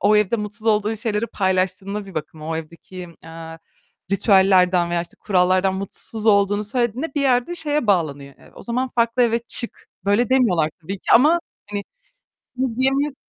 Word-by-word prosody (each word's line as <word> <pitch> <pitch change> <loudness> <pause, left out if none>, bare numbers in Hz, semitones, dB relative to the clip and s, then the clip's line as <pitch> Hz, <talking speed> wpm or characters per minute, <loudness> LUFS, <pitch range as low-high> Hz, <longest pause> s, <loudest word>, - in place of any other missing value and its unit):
o 210 +1 +4
evde 210 +2 +2
mutsuz 210 +1 -6
olduğun 215 0 +2
şeyleri 220 0 -2
paylaştığında 190 0 -1
bir 190 - -12
bakıma 155 +1 -6
o 160 - -2
evdeki, 170 +3 -9
eee, 165 0 -10 0.5
ritüellerden 190 -3 +4
veya 175 0 0
işte 170 - -15
kurallardan 185 -1 +2
mutsuz 210 +3 -5
olduğunu 205 0 +3
söylediğinde 245 +6 -2
bir 290 - 0
yerde 255 +4 +1
şeye 300 -6 -1
bağlanıyor. 145 -8 0
Eee, - - -19
o - - -12
zaman 250 +2 -2
farklı 235 +1 +1
eve 235 -1 +2
çık. 235 0 -2 0.2
Böyle 205 +4 +2
demiyorlar 200 -12 +2
tabii 190 +4 -6
ki - - -1
ama 305 +8 +5 0.3
hani 205 -1 -4 0.7
bunu 255 -3 -2
diyemeyiz. 270 +2 +1
205 Hz, 165 wpm, -21 LUFS, 185-235 Hz, 0.7 s, ama